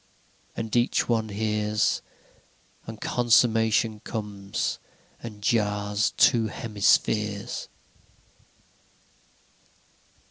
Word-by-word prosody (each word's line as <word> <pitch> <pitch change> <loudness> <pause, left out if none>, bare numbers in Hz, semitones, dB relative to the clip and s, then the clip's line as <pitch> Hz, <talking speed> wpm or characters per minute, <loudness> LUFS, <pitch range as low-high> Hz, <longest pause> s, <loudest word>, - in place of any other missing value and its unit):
And 110 0 -3
each 120 0 +2
one 110 -2 0
hears, 105 0 0 0.9
And 110 -1 -8
consummation 115 -2 +2
comes, 105 -3 -4 0.4
and 105 -3 -9
jars 105 -1 0
two 115 -2 +4
hemispheres. 105 -1 0
110 Hz, 65 wpm, -26 LUFS, 105-115 Hz, 0.9 s, two